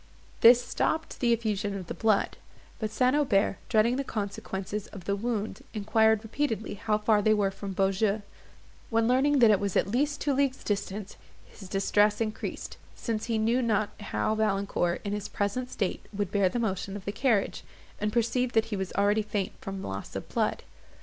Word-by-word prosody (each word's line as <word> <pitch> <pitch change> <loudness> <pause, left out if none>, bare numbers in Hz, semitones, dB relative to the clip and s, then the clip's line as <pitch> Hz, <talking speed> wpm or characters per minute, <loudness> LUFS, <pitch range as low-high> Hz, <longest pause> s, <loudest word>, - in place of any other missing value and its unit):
This 240 +1 +8
stopped 320 0 -1
the 240 -2 +2
effusion 210 -3 0
of 185 - -6
the - - -5
blood; 215 -3 +1 0.4
but 215 -2 -2
St. 250 +5 +2
Aubert, 210 -9 +2
dreading 230 +3 +3
the 275 - -1
consequence 200 -4 -4
of 205 -3 -5
the 200 - 0
wound, 220 +3 -3
enquired 220 +1 +3
repeatedly 225 -1 -2
how 210 +1 0
far 210 0 +3
they 215 +1 +4
were 200 -2 +1
from 195 0 -6
Beaujeu; 195 +2 +1 0.7
when, 225 -1 +2
learning 270 +4 +3
that 235 -4 +7
it 205 - +4
was 200 -2 -1
at 200 - +1 0.3
two 285 - 0
leagues' 270 -1 0
distance, 205 0 -3 0.3
his 195 -3 -13
distress 205 +2 +2
increased, 220 -1 -4 0.2
since 220 -3 -3
he 230 -2 0
knew 230 +4 +2
not 215 -3 +1
how 105 - -1
Valancourt, 200 -5 0
in 205 - -3
his 210 0 -4
present 210 +5 -2
state, 195 -6 -2
would 200 -2 -3
bear 200 -2 +3
the 210 - -3
motion 195 -3 -2
of 195 - -11
the 200 - -1
carriage, 220 -3 +1 0.4
and 210 0 0
perceived 240 +2 0
that 225 - +4
he - - +1
was 190 -1 -3
already 205 +2 +3
faint 205 -2 -2
from 195 0 -5
loss 95 0 -6
of - - -5
blood. - - 0
210 Hz, 185 wpm, -28 LUFS, 200-230 Hz, 0.7 s, This